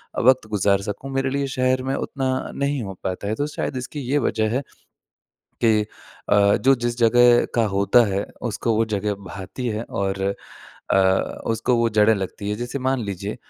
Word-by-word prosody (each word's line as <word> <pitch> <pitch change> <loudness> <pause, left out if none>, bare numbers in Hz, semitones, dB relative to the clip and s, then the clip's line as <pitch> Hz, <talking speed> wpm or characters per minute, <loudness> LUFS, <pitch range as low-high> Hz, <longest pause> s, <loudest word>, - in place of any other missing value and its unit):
अ, - - 0
वक़्त 130 -2 +4
गुज़ार 100 -1 +2
सकूँ, 135 +7 -8
मेरे 135 0 0
लिए 140 +1 -1
शहर 130 0 +2
में 135 +1 -1
उतना 135 -2 -2 0.2
नहीं 140 -1 -1
हो 95 -1 -6
पाता 95 +2 -3
है। 110 - -1
तो 145 +5 -1
शायद 130 - -3
इसकी 130 +4 -6
ये 145 - +3
वजह 110 -1 0
है 135 - +1 1.0
कि 110 -2 +4 0.5
अ, 100 0 +4
जो 135 +1 +4
जिस 120 -1 -3
जगह 120 +1 +5
का 115 - +3
होता 100 +5 +5
है, 100 - -1 0.2
उसको 115 -1 -1
वो 115 - +3
जगह 105 +1 -1 0.2
भाती 100 +6 -6
है 110 0 -2
और 95 0 -2 0.7
अ, - - +5 0.5
उसको 115 +2 +1
वो 115 0 +2
जड़ें 105 +1 +4
लगती 100 +1 -5
हैं। 105 - -1
जैसे 120 +4 -4
मान 130 0 0
लीजिए 100 +2 -5
115 Hz, 185 wpm, -22 LUFS, 100-130 Hz, 1.0 s, जगह